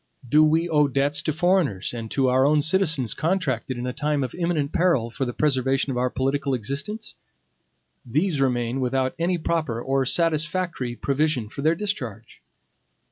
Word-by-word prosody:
Do 150 +6 +5
we 160 +2 +2
owe 150 -3 +3
debts 140 +2 0
to 155 - -1
foreigners 160 - +1
and 115 -2 -6
to 135 +2 +1
our 130 +1 +3
own 150 +1 +3
citizens 160 - +2
contracted 140 -8 -1
in 120 - -4
a 125 - -3
time 150 0 -1
of 125 - -4
imminent 170 -5 -1
peril 165 -10 +2
for 135 - -2
the 120 - -3
preservation 135 -1 +1
of 125 - -3
our 125 +1 +1
political 135 +2 -1
existence? 140 - -4 0.9
These 150 +4 0
remain 125 -1 0
without 130 +1 0
any 175 +2 +1
proper 155 -8 -1
or 135 +1 0
satisfactory 165 -4 0
provision 140 -4 0
for 140 - -7
their 160 +3 +3
discharge. 125 - -5
140 Hz, 165 wpm, -24 LUFS, 125-160 Hz, 0.9 s, Do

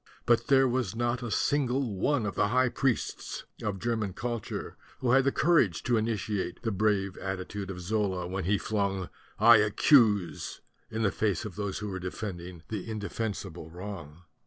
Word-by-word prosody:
But 120 -1 +3
there 135 -2 +5
was 120 -5 -1
not 120 +1 0
a 120 - -4
single 130 0 +1
one 125 +4 +1
of 100 - -2
the - - +2
high 130 +3 +3
priests 130 -2 -2 0.2
of 105 -2 -2
German 110 -3 -1
cul 120 +4 -2
ture - - -6 0.2
who 125 - 0
had 135 +1 +5
the 140 - +4
courage 150 - +3
to 120 - +2
initiate 105 -4 -2
the 115 - 0
brave 100 -2 +1
attitude 95 +1 -4
of 95 -1 -5
Zola 95 -1 -1
when 95 0 -3
he 100 +3 +3
flung 100 -3 -1 0.3
"I 115 +1 +8
accuse" 105 - +3 0.3
in 110 0 -2
the 100 - +3
face 100 -2 0
of 100 -5 -6
those 100 -2 -3
who 105 - -4
were 95 -1 -4
defending 90 -2 -6
an 110 - -1
inde 110 -2 -5
fensible 95 -7 -4
wrong. 90 -3 -8
105 Hz, 180 wpm, -29 LUFS, 95-120 Hz, 0.3 s, I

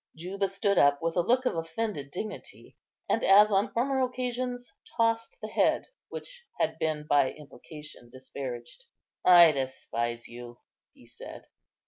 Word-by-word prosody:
Juba 190 +4 -3
stood 200 0 +1
up 145 0 +4
with 165 0 -1
a 175 - +3
look 250 +8 +1
of 250 - 0
offended 165 -3 -4
dignity, 210 +8 -8 0.3
and, - - 0
as 210 +2 +6
on 200 +3 +2
former 265 +3 0
occasions, 250 -1 -3 0.2
tossed 230 - 0
the - - -5
head - - +1 0.2
which - - -9 0.2
had - - 0
been 155 -1 -1
by 145 -3 +3
implication 150 -3 -12
disparaged. 130 - -8 0.4
"I 175 -3 +8
despise 120 -4 -4
you," 120 0 -10 0.4
he - - -19
said. - - -11
175 Hz, 140 wpm, -28 LUFS, 140-230 Hz, 0.4 s, I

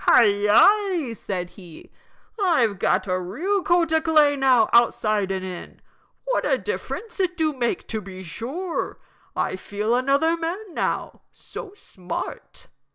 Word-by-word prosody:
"Hi, - - +7
yi!" 250 - +3
said 180 -4 -5
he. 175 -6 -14 0.5
"I've 240 - +2
got - - +1
a 185 -2 -1
real 355 - -1
coat 345 -3 +2
o' 320 - +3
clay 305 -3 +4
now 260 -4 +4
outside 215 -4 +3
and 190 -1 -3
in 180 -2 -8 0.5
what - - 0
a - - +2
difference 445 -1 -5
it 360 -1 0
do 315 -2 +1
make, 245 -3 -2
to 220 -2 -3
be 190 -1 -9
sure. 280 - -4 0.4
I - - -1
feel 210 +4 -2
another 280 +6 +2
man 345 +4 -5
now - - -2
so 405 -3 -10
smart." 185 - -7
260 Hz, 145 wpm, -23 LUFS, -, 0.5 s, Hi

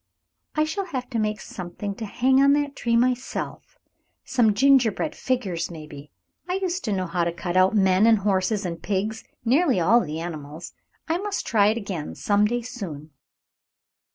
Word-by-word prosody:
"I 305 - +3
shall 380 +6 -2
have 260 -8 -5
to 230 - -1
make 215 0 -1
something 190 +3 -6
to 220 - -5
hang 260 +5 +3
on 280 0 +6
that 290 -1 0
tree 235 -1 0
myself; 250 +1 -2 0.5
some 225 -5 +2
gingerbread 270 +2 +3
figures, 195 -10 -2
maybe. 150 -3 -10 0.4
I 365 - 0
used 370 -1 -2
to 215 - -1
know 190 -2 0
how 175 0 -1
to 170 - 0
cut 175 +1 -5
out 185 +3 +4
men 190 +1 +4
and 225 -1 +6
horses 200 +1 0
and 170 -2 -4
pigs, 210 +3 -2 0.2
nearly 265 - +3
all 205 +8 +5
the 155 -4 -4
animals. 160 -1 -7 0.3
I 330 +2 0
must 410 0 -3
try 205 -3 +3
it 220 +2 +2
again 190 -8 -5
some 205 0 +2
day 240 +2 -1
soon." 170 - -7
215 Hz, 175 wpm, -24 LUFS, 180-255 Hz, 0.5 s, on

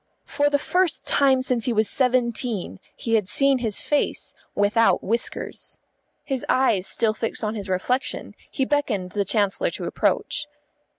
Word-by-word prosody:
For 290 0 +1
the 290 - +2
first 360 +3 0
time 265 -2 +3
since 250 -3 -1
he 245 - +1
was 215 -1 +2
seventeen 235 - 0 0.2
he 230 - -3
had 210 -4 +2
seen 275 -1 +2
his 220 -4 -2
face 295 - -1 0.2
without 210 +3 +3
whiskers. 230 +4 -4 0.5
His 270 -3 -3
eyes 220 -8 +2
still 225 -2 +2
fixed 225 +1 0
on 215 0 -1
his 205 -3 -5
reflection, 250 +9 -1 0.2
he 265 - -1
beckoned 230 -11 -1
the 205 +1 0
Chancellor 200 0 +1
to - - -6
approach. 295 0 -1
235 Hz, 155 wpm, -23 LUFS, 210-265 Hz, 0.5 s, time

